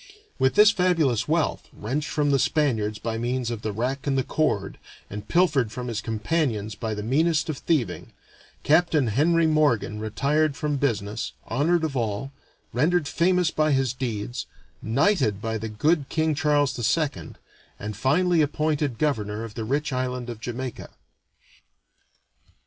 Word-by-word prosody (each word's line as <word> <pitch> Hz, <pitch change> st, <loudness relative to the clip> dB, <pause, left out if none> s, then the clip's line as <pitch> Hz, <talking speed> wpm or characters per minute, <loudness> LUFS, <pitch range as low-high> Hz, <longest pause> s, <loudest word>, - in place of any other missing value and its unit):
With 130 Hz, 0 st, +2 dB
this 210 Hz, 0 st, +7 dB
fabulous 165 Hz, -, +1 dB
wealth, 160 Hz, 0 st, 0 dB
wrenched 140 Hz, +7 st, -3 dB
from 145 Hz, -1 st, +1 dB
the 135 Hz, -, +3 dB
Spaniards 120 Hz, -6 st, +1 dB
by 115 Hz, +1 st, -3 dB
means 120 Hz, 0 st, -1 dB
of 115 Hz, -2 st, -4 dB
the 110 Hz, -, -2 dB
rack 130 Hz, +6 st, -3 dB
and 135 Hz, -1 st, +1 dB
the 130 Hz, -, +2 dB
cord, 115 Hz, -10 st, -1 dB, 0.3 s
and 105 Hz, +1 st, -7 dB
pilfered 155 Hz, -10 st, +2 dB
from 125 Hz, +1 st, -5 dB
his 115 Hz, -2 st, -3 dB
companions 110 Hz, -2 st, -1 dB
by 110 Hz, +1 st, -4 dB
the 105 Hz, -, -5 dB
meanest 155 Hz, +7 st, +1 dB
of 150 Hz, -, -3 dB
thieving, 155 Hz, -8 st, -1 dB, 0.5 s
Capt. 170 Hz, +3 st, +3 dB
Henry 155 Hz, +5 st, +3 dB
Morgan 145 Hz, -9 st, +2 dB
retired 140 Hz, +7 st, 0 dB
from 150 Hz, -2 st, -1 dB
business, 110 Hz, -7 st, -2 dB
honored 160 Hz, +7 st, +1 dB
of 155 Hz, -3 st, -2 dB
all, 115 Hz, +2 st, -2 dB, 0.4 s
rendered 155 Hz, +5 st, +2 dB
famous 180 Hz, +2 st, +2 dB
by 155 Hz, -1 st, +2 dB
his 135 Hz, -3 st, +1 dB
deeds, 120 Hz, -2 st, -4 dB, 0.3 s
knighted 120 Hz, -, +2 dB
by 110 Hz, 0 st, -3 dB
the 110 Hz, +1 st, -4 dB
good 145 Hz, +7 st, +1 dB
King 160 Hz, -1 st, +1 dB
Charles 145 Hz, -3 st, +1 dB, 0.2 s
II, 140 Hz, -, -3 dB, 0.4 s
and 105 Hz, 0 st, -6 dB
finally 160 Hz, -, +2 dB
appointed 150 Hz, -3 st, 0 dB
governor 110 Hz, -7 st, -1 dB
of 115 Hz, -2 st, -7 dB
the 110 Hz, -, -4 dB
rich 140 Hz, +4 st, -1 dB
island 125 Hz, -1 st, -2 dB
of 115 Hz, -, -9 dB
Jamaica. 125 Hz, +2 st, -5 dB
135 Hz, 150 wpm, -25 LUFS, 115-155 Hz, 0.5 s, this